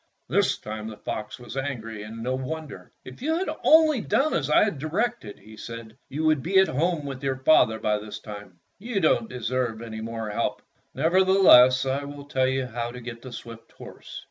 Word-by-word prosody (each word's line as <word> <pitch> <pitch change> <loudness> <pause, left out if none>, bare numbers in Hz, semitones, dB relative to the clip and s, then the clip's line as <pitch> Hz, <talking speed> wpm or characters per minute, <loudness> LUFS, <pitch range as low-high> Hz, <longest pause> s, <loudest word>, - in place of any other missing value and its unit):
This - - +2
time 110 0 -6
the 110 -1 -8
fox 105 0 -5
was 120 0 -10
angry, 115 -6 -4
and 110 +2 -8
no 125 +2 -1
wonder: 130 -6 -6
"If 130 - -11
you 320 +4 0
had 375 - -2
only 310 -5 +5
done 270 +11 +1
as 145 -3 -1
I 150 - +5
directed," 155 - -3
he 110 0 -15
said, 115 0 -9
"you 155 +4 -3
would 155 -3 +3
be 190 +6 +1
at 190 0 +6
home 155 +2 0
with 135 -2 -6
your 135 -1 0
father 130 -5 +4
by 105 -1 0
this 105 0 -8
time. 100 -4 -11 0.2
You 225 0 -2
don't 195 +6 +2
deserve 125 - -2
any 110 -1 -7
more 115 -1 -5
help. - - -2 0.3
Nevertheless, 170 -8 +6
I 135 +2 -1
will 145 0 -9
tell 130 -2 +1
you 130 0 0
how 120 -1 -4
to 125 +1 -8
get 115 -1 -8
the 130 - -10
swift 115 -1 -10
horse. - - -10
130 Hz, 195 wpm, -25 LUFS, 115-155 Hz, 0.3 s, at